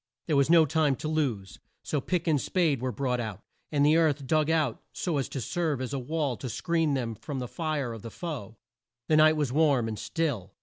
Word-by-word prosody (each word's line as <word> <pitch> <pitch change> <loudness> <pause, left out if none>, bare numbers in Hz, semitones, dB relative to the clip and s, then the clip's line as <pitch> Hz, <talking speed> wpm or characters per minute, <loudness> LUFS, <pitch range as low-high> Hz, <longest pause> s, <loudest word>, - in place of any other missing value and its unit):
There 155 - 0
was 140 +1 +3
no 165 -1 +7
time 150 -2 +2
to 155 - -5
lose. 130 -12 -2 0.2
So 150 - -1
pick 175 +3 -1
and 155 -5 +2
spade 160 -9 +1
were 130 0 -1
brought 125 -2 -1
out, 110 -4 -5 0.3
and 145 -1 +3
the 155 +2 +5
earth 150 -4 +2
dug 155 +2 +2
out 155 -7 +1
so 165 -6 -1
as 135 - -2
to 135 - -4
serve 155 +3 -1
as 130 +1 -4
a 140 - -1
wall 145 0 -1
to 130 - -5
screen 165 - 0
them 120 -4 -2
from 140 +6 -6
the 125 -1 -3
fire 150 -4 -2
of 115 - -8
the 115 - -7
foe. 125 - -6 0.5
The 155 - +5
night 155 0 +6
was 145 -5 0
warm 140 -6 +3
and 110 -2 -4
still. 145 - -2
145 Hz, 225 wpm, -28 LUFS, 125-160 Hz, 0.5 s, no